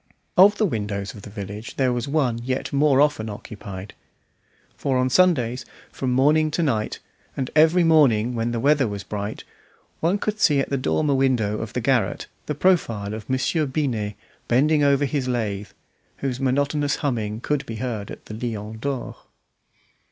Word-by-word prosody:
Of 200 Hz, +3 st, +7 dB
the 215 Hz, -, +2 dB
windows 105 Hz, -, -3 dB
of 105 Hz, -, -11 dB
the 105 Hz, -, -10 dB
village 105 Hz, +2 st, -7 dB
there 130 Hz, -2 st, +2 dB
was 120 Hz, +1 st, -2 dB
one 140 Hz, -6 st, +1 dB
yet 130 Hz, +3 st, -3 dB
more 140 Hz, -1 st, +4 dB
often 145 Hz, -7 st, +2 dB
occupied; 100 Hz, -2 st, -8 dB, 0.8 s
for 135 Hz, -2 st, 0 dB
on 130 Hz, 0 st, +1 dB
Sundays 130 Hz, -7 st, +3 dB, 0.3 s
from 130 Hz, -2 st, -2 dB
morning 150 Hz, +5 st, +3 dB
to 165 Hz, +3 st, -1 dB
night, 110 Hz, -8 st, -1 dB, 0.4 s
and 130 Hz, -2 st, -2 dB
every 160 Hz, +3 st, +5 dB
morning 130 Hz, -8 st, +4 dB
when 115 Hz, 0 st, -1 dB
the 120 Hz, -, -2 dB
weather 140 Hz, 0 st, +3 dB
was 100 Hz, -1 st, -5 dB
bright, 105 Hz, +1 st, -5 dB, 0.6 s
one 175 Hz, +5 st, +2 dB
could 215 Hz, +1 st, -3 dB
see 145 Hz, -8 st, +4 dB
at 135 Hz, -, -2 dB
the -, -, +2 dB
dormer 145 Hz, +2 st, +1 dB
window 125 Hz, -6 st, +1 dB
of -, -, -6 dB
the -, -, -1 dB
garret -, -, +1 dB, 0.2 s
the 150 Hz, -, -2 dB
profile 115 Hz, -, +1 dB
of 110 Hz, +1 st, -8 dB
Monsieur 130 Hz, +4 st, +1 dB
Binet 120 Hz, -8 st, -2 dB, 0.3 s
bending 145 Hz, +5 st, +3 dB
over 140 Hz, 0 st, +3 dB
his 135 Hz, -1 st, -2 dB
lathe, 105 Hz, -5 st, -2 dB, 0.5 s
whose 130 Hz, -2 st, -3 dB
monotonous 140 Hz, +2 st, +1 dB
humming 110 Hz, -5 st, -1 dB
could 145 Hz, +3 st, -1 dB
be 115 Hz, -, -5 dB
heard 110 Hz, -3 st, -4 dB
at -, -, -10 dB
the -, -, -8 dB
Lion 110 Hz, -1 st, -5 dB
d'Or. 135 Hz, +1 st, -4 dB
130 Hz, 170 wpm, -23 LUFS, 110-145 Hz, 0.8 s, Of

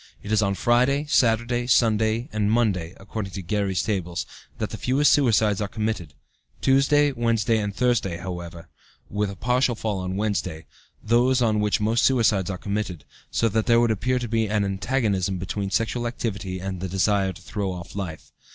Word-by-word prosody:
It 105 Hz, -, -6 dB
is 110 Hz, -1 st, +3 dB
on 100 Hz, -1 st, +1 dB
Friday, 125 Hz, +8 st, +2 dB
Saturday, 120 Hz, -2 st, +2 dB
Sunday, 110 Hz, 0 st, +2 dB
and 105 Hz, -1 st, +1 dB
Monday, 100 Hz, -7 st, 0 dB
according 95 Hz, 0 st, -6 dB
to 95 Hz, -, -5 dB
Guerry's 100 Hz, 0 st, -1 dB
tables, 90 Hz, -5 st, -2 dB, 0.3 s
that -, -, -3 dB
the -, -, -5 dB
fewest 135 Hz, +4 st, +3 dB
suicides 110 Hz, -7 st, +3 dB
are 100 Hz, -, -1 dB
committed, 105 Hz, -7 st, -3 dB, 0.4 s
Tuesday, 140 Hz, +2 st, +3 dB
Wednesday, 115 Hz, -3 st, +1 dB
and 105 Hz, -1 st, -2 dB
Thursday, 120 Hz, -7 st, +1 dB
with, 85 Hz, -, -8 dB
however, 85 Hz, -2 st, -7 dB, 0.5 s
a 105 Hz, -1 st, -1 dB
partial 125 Hz, +2 st, +1 dB
fall 110 Hz, -3 st, -2 dB
on 90 Hz, 0 st, -3 dB
Wednesday, 95 Hz, -6 st, -2 dB, 0.4 s
those 120 Hz, +3 st, +3 dB
on 110 Hz, -2 st, +2 dB
which 105 Hz, 0 st, +1 dB
most 110 Hz, +3 st, +1 dB
suicides 110 Hz, -8 st, +3 dB
are 95 Hz, -, -3 dB
committed, 100 Hz, -7 st, -4 dB, 0.2 s
so 115 Hz, -, +1 dB
that 110 Hz, +1 st, 0 dB
there 115 Hz, -1 st, +5 dB
would 120 Hz, -1 st, +3 dB
appear 125 Hz, +4 st, 0 dB
to 120 Hz, -1 st, -3 dB
be 115 Hz, -1 st, 0 dB
an 105 Hz, -1 st, +1 dB
antagonism 100 Hz, -2 st, 0 dB
between 95 Hz, +2 st, -3 dB
sexual 115 Hz, +3 st, 0 dB
activity 100 Hz, -6 st, -4 dB
and 95 Hz, 0 st, -4 dB
the 95 Hz, -, -3 dB
desire 95 Hz, +1 st, +1 dB
to 90 Hz, 0 st, -13 dB
throw 100 Hz, 0 st, -3 dB
off 90 Hz, 0 st, -8 dB
life. 85 Hz, -7 st, -6 dB
105 Hz, 180 wpm, -24 LUFS, 95-120 Hz, 0.5 s, there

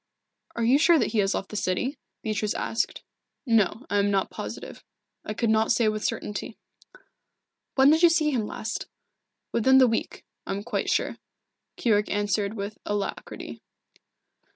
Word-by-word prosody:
"Are 235 Hz, -, -1 dB
you 255 Hz, +5 st, +5 dB
sure 335 Hz, +1 st, +6 dB
that 235 Hz, -, +1 dB
he 220 Hz, -, +1 dB
has 195 Hz, 0 st, +2 dB
left 195 Hz, -, -4 dB
the -, -, -8 dB
city?" 210 Hz, -, -1 dB, 0.2 s
Beatrice 215 Hz, -1 st, -1 dB
asked. 225 Hz, -, -2 dB, 0.4 s
"No, 225 Hz, +1 st, +2 dB
I 205 Hz, -, +1 dB
am 200 Hz, 0 st, +2 dB
not 195 Hz, -1 st, 0 dB
positive. -, -, -7 dB, 0.4 s
I 215 Hz, -, -5 dB
could 230 Hz, 0 st, +1 dB
not 220 Hz, 0 st, +3 dB
say 230 Hz, -, +3 dB
with 215 Hz, 0 st, -3 dB
certainty." 210 Hz, +2 st, -3 dB, 1.2 s
"When 270 Hz, +1 st, +6 dB
did 320 Hz, +1 st, +3 dB
you 345 Hz, -, +8 dB
see 310 Hz, -2 st, +2 dB
him 230 Hz, -6 st, -1 dB
last?" 220 Hz, +1 st, -5 dB, 0.6 s
"Within 260 Hz, +3 st, +4 dB
the 260 Hz, -, +8 dB
week, 225 Hz, -1 st, -3 dB, 0.2 s
I -, -, -1 dB
am 200 Hz, +1 st, -4 dB
quite 240 Hz, -, -2 dB
sure," -, -, 0 dB, 0.6 s
Keyork 210 Hz, -3 st, +2 dB
answered 205 Hz, 0 st, 0 dB
with 200 Hz, 0 st, -5 dB
alacrity. 205 Hz, -1 st, -4 dB
220 Hz, 160 wpm, -26 LUFS, 205-250 Hz, 1.2 s, you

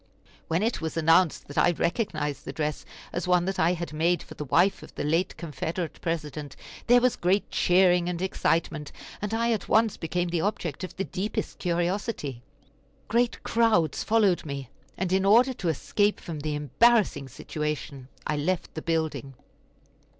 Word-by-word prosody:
When 165 Hz, +5 st, +1 dB
it 230 Hz, -3 st, 0 dB
was 160 Hz, 0 st, -3 dB
announced 165 Hz, +1 st, +3 dB
that 145 Hz, -, -2 dB
I -, -, +5 dB
recognized 160 Hz, -, -1 dB
the -, -, -5 dB
dress 150 Hz, -1 st, -3 dB, 0.3 s
as 175 Hz, +1 st, -2 dB
one 180 Hz, -1 st, +3 dB
that 195 Hz, 0 st, -2 dB
I 170 Hz, +2 st, +4 dB
had 170 Hz, -2 st, -5 dB
made 170 Hz, +3 st, +1 dB
for -, -, -11 dB
the 150 Hz, -, -6 dB
wife 190 Hz, +8 st, +3 dB
of -, -, -13 dB
the -, -, -3 dB
late 165 Hz, +5 st, 0 dB
Confederate 165 Hz, +1 st, -4 dB
President 150 Hz, -4 st, -4 dB, 0.3 s
there 245 Hz, +1 st, +7 dB
was 250 Hz, 0 st, +2 dB
great 185 Hz, +3 st, +1 dB
cheering 180 Hz, -1 st, +4 dB
and 175 Hz, -1 st, -3 dB
excitement, 165 Hz, -4 st, -1 dB, 0.3 s
and 210 Hz, 0 st, -3 dB
I 230 Hz, +1 st, +1 dB
at 215 Hz, -5 st, -2 dB
once 220 Hz, -1 st, +3 dB
became 175 Hz, +1 st, -2 dB
the 170 Hz, -1 st, 0 dB
object 185 Hz, -6 st, -2 dB
of 185 Hz, -, -6 dB
the 195 Hz, -, -2 dB
deepest 190 Hz, +5 st, -4 dB
curiosity. 175 Hz, -, -2 dB, 0.7 s
Great 235 Hz, +1 st, +1 dB
crowds 225 Hz, -9 st, +2 dB
followed 210 Hz, -5 st, +3 dB
me, 140 Hz, -4 st, -6 dB, 0.3 s
and 185 Hz, 0 st, -1 dB
in 190 Hz, 0 st, +3 dB
order 235 Hz, +6 st, +5 dB
to 180 Hz, -8 st, -2 dB
escape 205 Hz, +7 st, +1 dB
from 160 Hz, -3 st, -6 dB
the 150 Hz, 0 st, -2 dB
embarrassing 160 Hz, -, +3 dB
situation 150 Hz, -2 st, -5 dB, 0.2 s
I 150 Hz, -, -1 dB
left 180 Hz, +5 st, -1 dB
the 160 Hz, -, -5 dB
building. 160 Hz, -5 st, -2 dB
175 Hz, 170 wpm, -27 LUFS, 155-195 Hz, 0.7 s, there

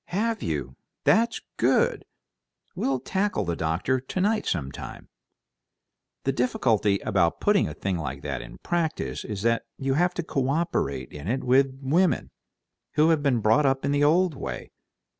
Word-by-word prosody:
"Have 220 Hz, +3 st, -1 dB
you? 70 Hz, -5 st, -3 dB, 0.3 s
That's 230 Hz, +1 st, +3 dB, 0.2 s
good! -, -, +2 dB, 0.7 s
We'll 135 Hz, -1 st, 0 dB
tackle 190 Hz, -, -1 dB
the 85 Hz, 0 st, -1 dB
doctor 80 Hz, +12 st, 0 dB
together 195 Hz, -, 0 dB
sometime. 70 Hz, -6 st, -5 dB, 1.1 s
The 135 Hz, -, +1 dB
difficulty 115 Hz, -5 st, +2 dB
about 95 Hz, -6 st, +1 dB
putting 205 Hz, -2 st, +3 dB
a -, -, -7 dB
thing 95 Hz, -3 st, -2 dB
like 70 Hz, -2 st, -5 dB
that -, -, -3 dB
in -, -, -11 dB
practice 165 Hz, -2 st, -2 dB
is 105 Hz, -3 st, -5 dB
that 115 Hz, 0 st, +1 dB
you 135 Hz, 0 st, 0 dB
have 175 Hz, +5 st, +2 dB
to 175 Hz, -, -2 dB
co 135 Hz, -4 st, -1 dB
operate 140 Hz, -, -1 dB
in 75 Hz, +2 st, -8 dB
it 130 Hz, +5 st, -1 dB
with 130 Hz, +1 st, +3 dB
women 170 Hz, +7 st, +2 dB, 0.6 s
who 155 Hz, +2 st, +4 dB
have 160 Hz, -2 st, +2 dB
been 135 Hz, -5 st, +2 dB
brought 110 Hz, +7 st, +4 dB
up 135 Hz, 0 st, +1 dB
in 140 Hz, -, +1 dB
the 145 Hz, 0 st, +2 dB
old 170 Hz, +3 st, +4 dB
way. 65 Hz, -, -6 dB
135 Hz, 160 wpm, -26 LUFS, 100-165 Hz, 1.1 s, who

